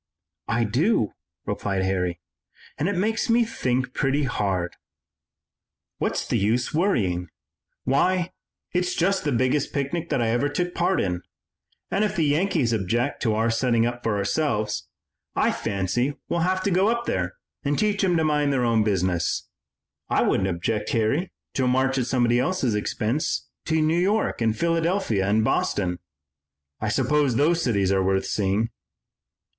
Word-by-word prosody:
"I 120 +1 +1
do," 120 - +1 0.3
replied 100 -2 -1
Harry, 90 -2 -1 0.6
"and 160 - +1
it 200 - -1
makes 220 +5 0
me 235 0 +4
think 130 - -1
pretty 140 +1 +1
hard." 95 -8 -1 1.2
"What's - - -1
the - - +1
use 115 +5 +1
of - - -13
worrying? 100 - +1 0.6
Why, 175 +7 +2 0.4
it's 180 0 0
just 195 +3 +1
the 145 - +1
biggest 130 +3 +1
picnic 160 +5 -2
that - - +1
I 115 -1 +1
ever 120 +5 +1
took 175 +4 -2
part 175 +2 +1
in, 90 -2 -1 0.7
and 200 - +2
if 210 -1 0
the 165 - +2
Yankees 145 -5 +1
object 115 +6 -1
to 110 -5 +1
our 115 +1 +2
setting 115 0 +2
up 120 0 -3
for 110 -3 0
ourselves 105 0 -1 0.5
I - - +3
fancy 100 +9 -1
we'll 170 - 0
have 185 +2 +1
to 200 - +1
go 185 +3 +3
up 235 +1 0
there - - -1 0.3
and 145 0 0
teach 210 -2 +1
'em 180 -3 +3
to 160 - +2
mind 150 -2 +2
their 130 -3 +1
own 115 -2 +3
business. 90 -5 0 0.6
I - - +3
wouldn't 95 0 +1
object, 105 +5 -2
Harry, 120 - +1 0.2
to 130 - +1
a - - +2
march 130 +1 +2
at 125 - -1
somebody 120 -1 +2
else's 135 -5 0
expense 110 +6 -1 0.2
to 160 0 +1
New 155 +2 +2
York 200 - +1
and 110 -1 +1
Philadelphia 165 - +1
and 110 +2 +3
Boston. 90 -4 0 0.8
I 110 - -1
suppose 145 +2 +2
those 165 +6 +3
cities 100 - +1
are 95 -1 +2
worth 95 0 +1
seeing." 100 +3 0
125 Hz, 160 wpm, -24 LUFS, 105-170 Hz, 1.2 s, me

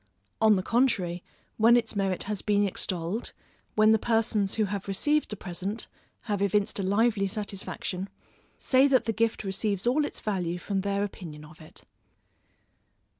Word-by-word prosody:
On 220 -1 +6
the 185 - -1
contrary, 190 -8 +1 0.3
when 230 +2 +6
its 225 -2 -2
merit 195 -2 0
has 205 -1 -3
been 205 -1 +2
extolled, 185 +3 -3 0.4
when 215 0 +5
the 220 - +4
persons 225 -3 +1
who 220 - +2
have 200 0 -4
received 295 +10 +1
the 210 - -4
present, 195 +3 -4 0.3
have 205 -3 -2
evinced 200 +1 +1
a - - -1
lively 200 +1 +2
satisfaction, 195 -2 -5 0.5
say 265 +1 +4
that 265 -2 +3
the 225 - 0
gift 225 0 0
receives 195 0 -1
all 265 +5 +3
its - - -4
value 180 -5 -2
from 195 +2 -2
their 200 +1 -1
opinion 160 -7 -7
of 155 +3 -15
it. 155 - -12
205 Hz, 160 wpm, -28 LUFS, 190-225 Hz, 0.5 s, On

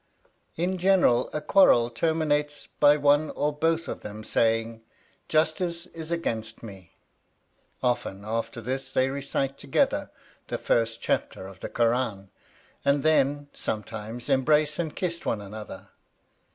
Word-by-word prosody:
In 180 +3 -1
general 180 -10 +4
a 150 - -2
quarrel 135 -9 +5
terminates 150 +1 0
by 145 0 +4
one 145 +1 +3
or 150 +1 0
both 165 +2 0
of - - -4
them 105 +1 -8
saying 115 0 0 0.5
"Justice 170 +2 +1
is 165 -3 -8
against 115 -11 -3
me"; 95 -5 -11 0.9
often 105 -5 -1
after 115 +2 -3
this 130 +3 -4
they 130 0 +2
recite 140 0 -2
together - - +1 0.4
the - - -2
first 115 0 0
chapter - - -1
of 95 -1 -11
the - - -6
Kur 115 -1 +2
ân; 110 -6 -2 0.5
and 140 0 +2
then, 145 -2 +2
sometimes, 110 +2 -5
embrace 150 +3 +2
and 160 -3 -2
kiss 170 -2 -3
one 110 - -1
another. 105 +1 -9
135 Hz, 135 wpm, -26 LUFS, 115-155 Hz, 0.9 s, quarrel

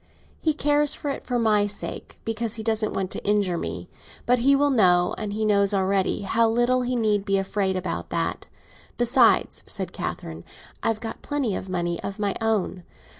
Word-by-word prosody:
"He 315 -2 0
cares 295 0 +2
for 290 - -4
it - - -6
for 245 - 0
my 210 -3 +3
sake, 205 - -7
because 225 0 -1
he 220 - -5
doesn't 220 -1 0
want 190 -1 -2
to - - -3
injure 205 -3 +1
me. - - -5 0.4
But 250 0 +3
he 275 +4 +4
will 285 +1 +3
know—he 205 0 +2
knows 200 -1 +3
already—how 195 +3 +1
little 240 +2 +2
he 250 0 -1
need 215 -4 +1
be 195 -1 +1
afraid 195 0 -1
about 185 0 -4
that. - - -2 0.5
Besides," 240 0 +3
said 190 -3 -1
Catherine, 85 0 -5 0.4
"I - - -1
have 225 -1 0
got 225 - -6
plenty 275 -9 -1
of 190 - -6
money 175 -2 -2
of 195 - -5
my 205 -2 -1
own. 215 -4 0
215 Hz, 175 wpm, -24 LUFS, 195-240 Hz, 0.5 s, he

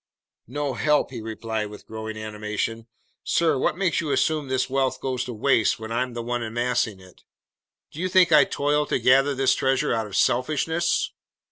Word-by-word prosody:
"No 145 +2 -3
help!" 150 +2 +1
he 120 -4 -6
replied 110 -1 -4
with 105 - -12
growing 110 0 -6
animation. 110 +1 -4 0.4
"Sir, 160 -5 +1
what 155 - 0
makes 185 -4 +1
you 155 - -4
assume 155 0 +1
this 130 0 0
wealth 135 0 0
goes 130 -1 -2
to 125 - -6
waste 115 -1 +2
when 110 0 -8
I'm 125 +1 -1
the 120 - -4
one 120 +1 -2
amassing 115 -2 -1
it? 95 -1 -18 0.7
Do 150 - -10
you 185 +1 -1
think 180 -2 +5
I 150 -2 +8
toil 145 +1 0
to - - +1
gather 135 +2 +4
this 130 0 +3
treasure 135 -2 +1
out 110 -2 -1
of 100 - -8
selfishness? 155 +7 +1
130 Hz, 180 wpm, -24 LUFS, 110-145 Hz, 0.7 s, I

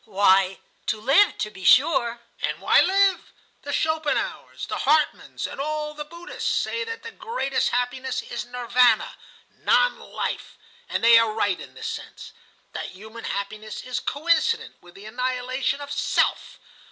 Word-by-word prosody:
"Why, 195 -2 +3 0.3
to 215 - 0
live, 275 - +4
to 210 - -3
be 190 - -12
sure." 240 - +4 0.2
"And - - -2
why - - +5
live? 390 0 +2 0.3
The 285 - -6
Schopenhauers, 315 0 -1
the - - -4
Hartmanns, 305 +2 +1
and - - -5
all 300 +1 -3
the 300 0 -6
Buddhists, 340 +4 -5
say 465 - 0
that 455 0 -7
the 460 - -7
greatest 445 - -1
happiness 250 +1 -2
is 240 - -5
Nirvana, 245 -1 +2 0.5
Non - - +3
Life; - - -5 0.3
and - - -2
they 230 0 +8
are 230 -1 +2
right 205 -3 0
in - - -11
this - - -8
sense,—that - - -8
human 220 +4 -10
happiness 210 +1 -5
is 255 -1 -3
coincident 335 +9 +1
with 175 0 -17
the 200 - -12
annihilation 255 +3 -2
of 285 0 -7
'Self. 285 - 0
255 Hz, 150 wpm, -24 LUFS, 220-305 Hz, 0.5 s, they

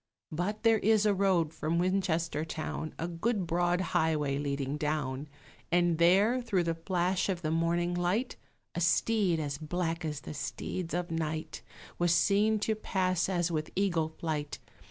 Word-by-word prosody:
But 185 +8 -2
there 225 -1 +5
is 215 0 +3
a 210 - +4
road 185 -5 +2
from 160 +2 -1
Winchester 175 -4 0
town, 155 0 -5
A 165 - -2
good 190 +4 -1
broad 175 +2 +1
highway 155 -5 +1
leading 140 -1 -2
down; 150 -2 -2 0.4
And 175 -1 +3
there, 200 +9 +4
through 195 -7 +1
the 165 -1 0
flash 180 +3 0
of 180 -2 -2
the 155 - 0
morning 170 +2 +1
light, 180 +8 0 0.4
A 175 - -3
steed, 185 0 +2
as 145 -2 -3
black 165 +1 -2
as 150 -3 -3
the - - -7
steeds 170 +3 -4
of 175 -1 -2
night, 155 -7 -3 0.4
Was 175 -1 +3
seen 205 +5 +3
to 220 - +1
pass 185 -4 0
as 175 -2 0
with 155 -1 -2
eagle 175 -5 +1
flight. 155 -2 -4
170 Hz, 160 wpm, -30 LUFS, 160-190 Hz, 0.4 s, there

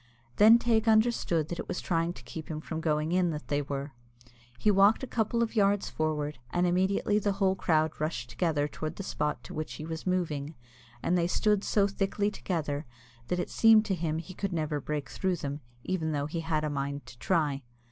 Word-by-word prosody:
Then 220 +3 +8
Teig 230 -1 +1
understood 220 -8 +3
that 175 - -4
it - - -5
was - - -3
trying 165 0 0
to - - -13
keep 160 -1 -8
him 155 -1 -3
from 160 +1 -5
going 155 0 0
in, 180 -1 +3
that 150 -2 -5
they 145 0 +1
were. 140 0 -5 0.6
He 210 - +3
walked 200 +5 +5
a - - 0
couple 235 -1 0
of 230 - -4
yards 200 -1 +2
forwards, 150 -3 -2
and 175 0 +1
immediately 190 +3 +2
the 205 -1 0
whole 195 -1 +2
crowd 160 -4 +2
rushed 155 -7 -2
together 155 -5 0
towards 155 +2 -5
the 195 - -6
spot 150 -5 -2
to - - -9
which 155 0 -4
he 155 - -7
was 160 +2 -6
moving, 160 -5 -1 0.5
and 175 - +2
they 170 -1 +2
stood 210 +2 +2
so 205 -2 +3
thickly 200 +1 0
together 155 -7 -3 0.4
that 180 - 0
it 175 - -3
seemed 225 -1 +6
to 205 - 0
him 165 -3 -1
that 165 - -3
he 185 - -10 0.2
never 155 -3 -1
could - - -15
break 150 -2 -2
through 185 -1 -1
them, 145 -2 -5 0.2
even 160 -4 -1
though 145 -1 -1
he 160 +3 -3
had 160 -2 -1
a 155 - 0
mind 140 0 -3
to - - -12
try. 150 -6 +1
170 Hz, 215 wpm, -29 LUFS, 150-195 Hz, 0.6 s, Then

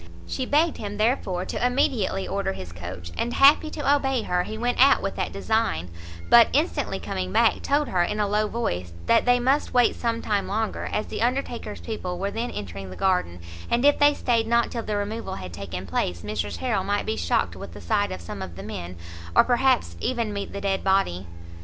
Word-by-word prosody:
She 255 - -3
begged 315 +3 +2
him, 205 -1 -5
therefore, 210 -5 0
to - - -4
immediately 245 -6 +1
order 195 -1 -1
his 90 - -8
coach, 85 0 -8
and, 240 - -2
happy 290 +3 +6
to 290 -2 +2
obey 270 -4 0
her, 180 0 0
he 220 - -6
went 245 +2 -1
out 275 - +5
with - - -2
that - - -2
design; 90 - -1 0.4
but, - - +8
instantly - - 0
coming 90 0 -4
back, - - +3
told 290 +1 +1
her, 180 - +1
in 210 +5 -1
a 210 - +2
low 210 +1 +1
voice, 90 - -3
that - - +4
they 245 0 +4
must 265 +3 +1
wait 245 -1 +4
some 230 -1 -1
time 205 -2 0
longer, 220 +2 -2
as 215 - -1
the - - -5
Undertaker's 240 -3 -2
people 185 -5 -4
were 200 +2 -2
then 230 +3 -3
entering 95 -1 -7
the 90 - -9
garden, 180 - 0 0.3
and 240 +3 +2
if 290 - +5
they 290 0 +5
stayed 230 -3 +1
not 235 0 +2
till 235 - -3
the 210 -2 -2
removal 215 +3 -4
had 90 -2 -8
taken 95 0 -6
place, 85 -1 -2
Mrs 105 0 -3
Harrel 225 -7 -1
might 205 +1 -1
be 220 - -1
shocked - - 0
with - - -9
the - - -8
sight 205 -2 0
of 90 - -6
some 85 +3 -7
of 90 -3 -7
the 95 - -8
men, 90 -4 -6 0.4
or - - +8
perhaps 255 0 +2
even 235 -4 -1
meet 200 0 -4
the 200 - -6
dead 195 -1 -1
body. 190 - +1
210 Hz, 215 wpm, -25 LUFS, -, 0.4 s, but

